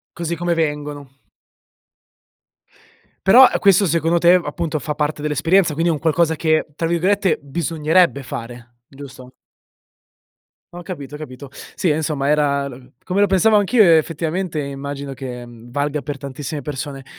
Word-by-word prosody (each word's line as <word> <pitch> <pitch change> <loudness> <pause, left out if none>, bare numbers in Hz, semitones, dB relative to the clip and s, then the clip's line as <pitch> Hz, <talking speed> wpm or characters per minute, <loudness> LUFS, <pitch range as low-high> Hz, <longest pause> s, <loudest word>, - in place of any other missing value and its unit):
Così 170 0 -3
come 175 +1 -1
vengono. 150 -3 -3 2.2
Però, 250 +7 +8
questo, 195 0 +4
secondo 165 +1 +1
te, 175 +1 +5
appunto, 165 -2 -2
fa 150 0 -4
parte 150 0 -2
dell'esperienza, 165 +3 +2
quindi 165 +3 +1
un 155 - -2
qualcosa 160 0 +1
che 155 0 +1
tra 165 +1 -2
virgolette 185 +2 +1
"bisognerebbe" 160 +1 +1
fare, 120 0 -9
giusto? 135 -2 -12 1.4
Ho 175 - -8
capito, 145 -5 -8
ho - - -7
capito. 140 -2 -9 0.3
Sì, 180 - 0
ehm, 150 - +2
insomma 150 -3 -2
era 140 -1 +1
l 130 -1 -12
come 190 +2 0
lo 205 - +4
pensavo 205 +3 +3
anch'io 210 +2 +4
effettivamente 165 0 +1
immagino 140 0 -5
che, 125 -2 -7
mhmm, 120 0 -14
valga 145 +2 -2
per 145 -1 -5
tantissime 140 +2 -6
persone. 135 -1 -6
150 Hz, 145 wpm, -19 LUFS, 140-170 Hz, 2.2 s, Però